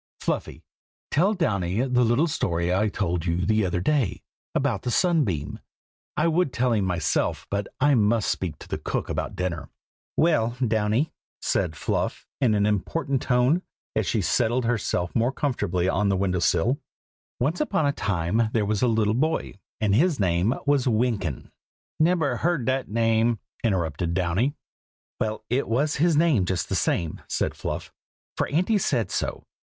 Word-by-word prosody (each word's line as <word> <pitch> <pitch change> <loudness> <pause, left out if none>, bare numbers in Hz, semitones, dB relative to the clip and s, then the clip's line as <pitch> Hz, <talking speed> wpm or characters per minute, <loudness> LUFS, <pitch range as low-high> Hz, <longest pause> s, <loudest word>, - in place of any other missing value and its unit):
Fluffy, - - -3 0.5
tell 190 +8 +3
Downy 100 - 0
the 125 -1 +2
little 120 +7 +3
story 85 - 0
I 105 +4 +2
told 90 -4 -2
you 85 +2 0
the 110 0 +2
other 90 0 -1
day, 130 +2 0 0.3
about - - +1
the 125 - -3
sunbeam. 120 - +1 0.6
I 155 - +3
would 165 -3 +2
tell 125 0 +1
it 115 - +3
to - - +2
him 100 - 0
myself, 85 -4 0
but 100 0 -1
I 145 +1 +4
must 110 -2 +2
speak 90 -5 -3
to - - -5
cook - - -3
about - - -3
dinner." 85 -6 -3 0.5
"Well, 120 -8 +2
Downy," 110 +7 +1 0.3
said 90 -5 0
Fluff, - - -2
in 120 -6 +3
an 105 0 +2
important 130 - 0
tone, 125 +7 +2 0.3
as - - 0
she - - +1
settled 120 +2 +1
herself 105 -7 -1
more 120 +3 +2
comfortably 105 - -1
on 100 +2 +1
the 95 - +2
window 90 -1 0
sill, 100 - +2 0.6
"Once 150 - 0
upon 195 - +1
a 140 - +3
time 100 0 0
there 110 -3 +2
was 105 0 0
a 125 - +4
little 110 -2 +2
boy, 155 +7 0 0.3
and 105 -2 +1
his 150 - +3
name 95 +5 +2
was 140 -3 +2
Wynkyn." 110 - 0 0.5
"Nebber 160 -6 +2
heard 165 -5 0
dat 130 0 0
name!" 115 +1 +2 0.3
interrupted 85 -5 0
Downy. 95 - +1 0.6
"Well, 110 0 -2
it 125 +4 0
was 140 +7 +1
his 160 +1 +3
name 150 - +3
just 90 -1 -2
the - - 0
same," 85 -3 0
said - - -1
Fluff, - - -5 0.4
"for - - 0
Auntie 185 +8 +2
said 125 - 0
so. - - -3
115 Hz, 165 wpm, -25 LUFS, 95-140 Hz, 0.6 s, I